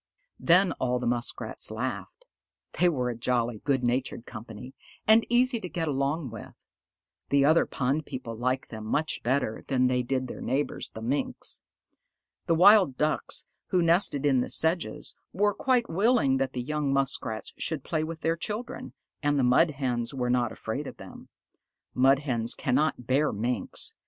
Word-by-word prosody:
Then 180 Hz, +2 st, +4 dB
all 125 Hz, -1 st, 0 dB
the 125 Hz, -, -4 dB
Muskrats 120 Hz, 0 st, -2 dB
laughed. -, -, -5 dB, 0.5 s
They 180 Hz, -, +5 dB
were 125 Hz, -6 st, -1 dB
a -, -, -6 dB
jolly, 120 Hz, -1 st, -1 dB
good 135 Hz, -3 st, +1 dB
natured 120 Hz, -1 st, -1 dB
company, 115 Hz, +2 st, -9 dB, 0.3 s
and 220 Hz, +1 st, +5 dB
easy 245 Hz, 0 st, +3 dB
to 180 Hz, -, -6 dB
get 165 Hz, -2 st, -2 dB
along 140 Hz, 0 st, -1 dB
with. 115 Hz, -, -10 dB, 0.7 s
The 140 Hz, 0 st, +4 dB
other 160 Hz, +3 st, +4 dB
pond 140 Hz, +4 st, -1 dB
people 130 Hz, -4 st, -6 dB
liked 130 Hz, +3 st, -2 dB
them 110 Hz, -1 st, -7 dB
much 150 Hz, +8 st, -1 dB
better 125 Hz, -3 st, -1 dB
than 130 Hz, -2 st, +2 dB
they 125 Hz, 0 st, +2 dB
did 130 Hz, +1 st, -2 dB
their -, -, -8 dB
neighbors, 135 Hz, +4 st, -2 dB
the 110 Hz, -, -9 dB
Minks. 135 Hz, +5 st, -1 dB, 0.9 s
The 165 Hz, -, +3 dB
Wild 185 Hz, -6 st, +6 dB
Ducks 155 Hz, +1 st, -1 dB, 0.2 s
who 180 Hz, -2 st, +2 dB
nested 165 Hz, -4 st, +3 dB
in 135 Hz, -3 st, +3 dB
the -, -, -3 dB
sedges, 165 Hz, +2 st, +2 dB, 0.2 s
were 205 Hz, +2 st, +2 dB
quite 250 Hz, 0 st, +1 dB
willing 195 Hz, -, +2 dB
that 135 Hz, -1 st, -1 dB
the 125 Hz, -, -3 dB
young 150 Hz, 0 st, -1 dB
Muskrats 135 Hz, -5 st, -1 dB
should 155 Hz, -4 st, -2 dB
play 155 Hz, -2 st, -1 dB
with 160 Hz, 0 st, -6 dB
their 165 Hz, 0 st, +1 dB
children, 210 Hz, +7 st, -6 dB, 0.3 s
and 145 Hz, -1 st, +1 dB
the 135 Hz, -, +2 dB
Mud 125 Hz, +7 st, +4 dB
Hens 125 Hz, -4 st, -3 dB
were 125 Hz, -2 st, -1 dB
not 120 Hz, -2 st, +1 dB
afraid 135 Hz, +6 st, -5 dB
of -, -, -9 dB
them. -, -, -12 dB, 0.6 s
Mud 135 Hz, +2 st, +4 dB
Hens 120 Hz, -5 st, -2 dB
cannot 130 Hz, -1 st, 0 dB
bear 140 Hz, +5 st, +2 dB
Minks. 120 Hz, +4 st, -1 dB
135 Hz, 165 wpm, -27 LUFS, 125-160 Hz, 0.9 s, Wild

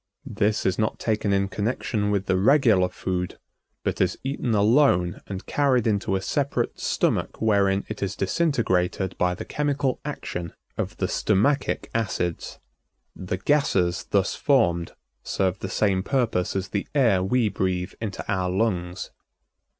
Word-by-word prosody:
This 110 Hz, -4 st, 0 dB
is 95 Hz, -, +1 dB
not 110 Hz, -, 0 dB
taken 110 Hz, -2 st, 0 dB
in 100 Hz, 0 st, +2 dB
connection 105 Hz, 0 st, -1 dB
with 100 Hz, -1 st, 0 dB
the 95 Hz, -, +1 dB
regular 105 Hz, -3 st, +4 dB
food, 90 Hz, -1 st, -3 dB, 0.5 s
but -, -, -1 dB
is -, -, +1 dB
eaten 130 Hz, -4 st, -1 dB
alone 105 Hz, -5 st, +3 dB
and 95 Hz, -1 st, -6 dB
carried 135 Hz, -5 st, +2 dB
into 100 Hz, -3 st, +1 dB
a 95 Hz, -, -1 dB
separate 140 Hz, +4 st, -1 dB
stomach -, -, 0 dB
wherein 100 Hz, -3 st, +2 dB
it 110 Hz, -, -6 dB
is 100 Hz, 0 st, -2 dB
disintegrated 95 Hz, -, 0 dB
by 90 Hz, 0 st, +2 dB
the -, -, -7 dB
chemical 145 Hz, -3 st, -1 dB
action 90 Hz, -, -5 dB, 0.2 s
of -, -, -4 dB
the -, -, 0 dB
stomachic 110 Hz, +8 st, +1 dB
acids. 95 Hz, -6 st, -2 dB, 0.6 s
The 95 Hz, 0 st, -4 dB
gases 95 Hz, -8 st, +1 dB
thus 100 Hz, -2 st, +1 dB
formed 85 Hz, -, +2 dB, 0.3 s
serve 95 Hz, -1 st, -1 dB
the 95 Hz, -, -5 dB
same 95 Hz, -2 st, +1 dB
purpose 115 Hz, -6 st, 0 dB
as 95 Hz, -1 st, -2 dB
the 100 Hz, -, -2 dB
air 115 Hz, -10 st, +4 dB
we 120 Hz, +4 st, +2 dB
breathe 95 Hz, -2 st, -1 dB
into 105 Hz, -4 st, -4 dB
our 95 Hz, -3 st, 0 dB
lungs. 90 Hz, -2 st, -1 dB
100 Hz, 145 wpm, -25 LUFS, 95-115 Hz, 0.6 s, regular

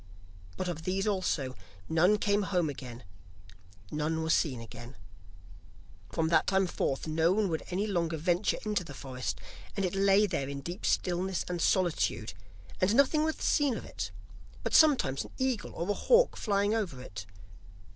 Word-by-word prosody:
But -, -, -2 dB
of 170 Hz, -2 st, -3 dB
these 190 Hz, +3 st, -1 dB
also, 180 Hz, -10 st, 0 dB, 0.3 s
none 180 Hz, +6 st, +4 dB
came 205 Hz, 0 st, +2 dB
home 180 Hz, -6 st, 0 dB
again, 125 Hz, -3 st, -9 dB, 0.9 s
none 160 Hz, +2 st, -1 dB
were 160 Hz, -, 0 dB
seen 135 Hz, -8 st, +2 dB
again. 120 Hz, +2 st, -10 dB, 1.2 s
From 160 Hz, -1 st, 0 dB
that 160 Hz, -1 st, +3 dB
time 190 Hz, -1 st, +3 dB
forth, 135 Hz, -6 st, -2 dB
no 160 Hz, +2 st, +2 dB
one 205 Hz, -1 st, +1 dB
would 160 Hz, -1 st, -1 dB
any 190 Hz, +3 st, -1 dB
longer 170 Hz, -5 st, -1 dB
venture 175 Hz, +5 st, +1 dB
into 210 Hz, -3 st, 0 dB
the 145 Hz, -4 st, -10 dB
forest, 130 Hz, -3 st, -4 dB, 0.4 s
and 195 Hz, -, +1 dB
it 180 Hz, -, -2 dB
lay 195 Hz, +1 st, +4 dB
there 165 Hz, -8 st, -2 dB
in 140 Hz, 0 st, -5 dB
deep 175 Hz, +7 st, -4 dB
stillness 185 Hz, +1 st, 0 dB
and 175 Hz, -1 st, -3 dB
solitude, 180 Hz, -2 st, +1 dB, 0.5 s
and 195 Hz, +4 st, +3 dB
nothing 280 Hz, +3 st, +4 dB
was 315 Hz, 0 st, 0 dB
seen 280 Hz, -6 st, +1 dB
of -, -, -8 dB
it, -, -, -5 dB, 0.5 s
but -, -, -2 dB
sometimes 265 Hz, -, +5 dB
an -, -, -13 dB
eagle 260 Hz, -4 st, -1 dB
or 170 Hz, -, -3 dB
a -, -, +2 dB
hawk 485 Hz, -, +4 dB
flying 205 Hz, 0 st, +1 dB
over 195 Hz, -, -2 dB
it. 95 Hz, -7 st, -8 dB
180 Hz, 165 wpm, -30 LUFS, 155-205 Hz, 1.2 s, sometimes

